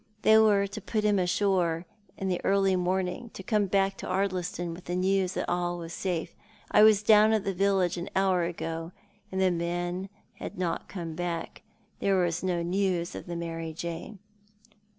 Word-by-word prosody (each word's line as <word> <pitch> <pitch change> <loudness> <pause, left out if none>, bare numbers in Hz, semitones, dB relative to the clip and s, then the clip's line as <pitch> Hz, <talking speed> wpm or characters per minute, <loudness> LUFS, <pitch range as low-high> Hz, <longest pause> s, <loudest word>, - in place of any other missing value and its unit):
They 220 - +6
were 205 -2 +4
to 200 +2 -7
put 215 +2 -2
him 205 -2 +3
ashore 180 -2 +1 0.3
in 195 - -3
the 180 -2 -1
early 195 -1 +3
morn 185 +1 +1
ing, 180 - -5
and 235 - -13
to 190 - -7
come 210 0 +1
back 195 0 +1
to - - -7
Ardliston 180 -3 -1
with 175 +2 -11
the 175 - -2
news 185 0 +1
that - - -2
all 175 0 -1
was 170 -1 -7
safe. 175 -4 -3 0.4
I - - +6
was 215 -1 +6
down 215 0 +6
at 215 -2 +1
the 195 - -1
village 190 -1 +1
an 175 +2 -5
hour 190 -2 +3
ago, 165 0 -4 0.4
and 190 - -2
the 190 -1 +3
men 175 +2 -2 0.3
had - - -7
not 180 -2 -2
come 170 -4 -5
back. 170 0 -4 0.4
There 195 -1 +2
was 175 -1 0
no 180 -2 0
news 180 -1 0
of - - -8
the 175 - -4
Mary 165 -1 -4
Jane."" 170 +6 -6
185 Hz, 190 wpm, -28 LUFS, 175-195 Hz, 0.4 s, They